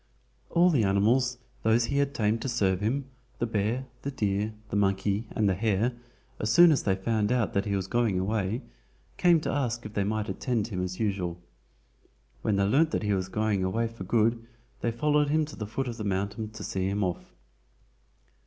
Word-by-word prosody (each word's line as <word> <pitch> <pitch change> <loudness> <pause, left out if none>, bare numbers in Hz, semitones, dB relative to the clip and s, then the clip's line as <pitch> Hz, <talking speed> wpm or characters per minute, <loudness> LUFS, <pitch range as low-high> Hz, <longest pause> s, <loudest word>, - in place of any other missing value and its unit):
All 175 +1 +4
the 130 -8 +3
animals, 115 +6 +2 0.2
those 110 +2 +3
he 140 +3 0
had 140 0 0
tamed 110 +1 +1
to 135 - -2
serve 95 -6 +1
him, 130 +6 0 0.3
the 120 - 0
bear, 110 +3 -1 0.2
the 140 - -3
deer, 105 -4 -1 0.2
the - - -3
monkey, 100 +2 +1
and 105 - 0
the 95 - +3
hare, 110 +4 +1 0.5
as 105 - -1
soon 170 +6 +8
as 145 - +2
they 95 -2 +1
found 105 +2 0
out 125 -4 +1
that 100 0 +1
he 100 -1 0
was 95 -2 -1
going 115 -2 +1
away, 100 +3 -1 0.5
came 175 -2 +5
to - - -2
ask 120 -4 -1
if 105 - -7
they 100 - +1
might 105 +1 -1
attend 115 -3 -1
him 90 -4 -3
as 90 0 -4
usual. 95 -5 -1 1.0
When 105 - +1
they 100 - +2
learned 145 +10 +3
that 155 - -2
he 105 -1 +1
was 95 -1 -1
going 105 -1 0
away 115 +5 0
for 115 -4 -9
good 115 +3 +1 0.4
they 120 - 0
followed 150 +4 +2
him 155 +1 +2
to 150 - -10
the 105 - -5
foot 135 +5 -3
of 120 -1 -5
the 110 - -4
mountain 100 +2 -2
to 110 -1 -9
see 95 -1 -1
him 100 +1 0
off. 90 -2 -4
110 Hz, 205 wpm, -28 LUFS, 100-120 Hz, 1.0 s, soon